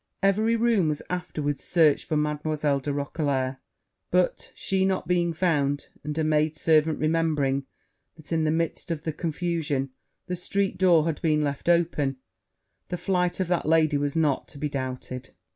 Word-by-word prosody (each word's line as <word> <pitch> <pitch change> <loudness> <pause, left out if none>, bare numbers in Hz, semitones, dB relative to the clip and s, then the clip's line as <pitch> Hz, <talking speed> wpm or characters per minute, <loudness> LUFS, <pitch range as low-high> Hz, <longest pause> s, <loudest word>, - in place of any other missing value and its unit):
Every 215 +4 +3
room 230 -6 +2
was 150 - -3
afterwards 155 -5 -3
searched 160 -4 +3
for 155 - 0
Mademoiselle 150 -1 0
de 145 +2 -3
Roquelair; 140 -2 -1 0.5
but 180 0 +1
she 190 -1 0
not 190 -4 0
being 175 -1 +2
found, 150 -5 0
and 150 +1 -4
a 160 - +1
maid 155 0 +2
servant 155 0 +3
remembering 155 -4 +1 0.5
that, 155 -1 -12
in 160 -1 +1
the 155 - +2
midst 165 +2 -1
of 160 -2 -3
the 160 - -2
confusion, 160 -5 -2 0.3
the 180 - -3
street 195 +1 -1
door 175 -4 +5
had 165 -2 -2
been 155 -2 +2
left 140 +3 -2
open, 160 -6 +2 0.7
the 180 - -3
flight 180 -1 0
of 185 - 0
that 175 -4 0
lady 155 -2 +4
was 145 +1 -1
not 150 -4 +1
to - - -11
be 150 +1 -2
doubted. 130 -1 -5
155 Hz, 165 wpm, -26 LUFS, 145-175 Hz, 0.7 s, door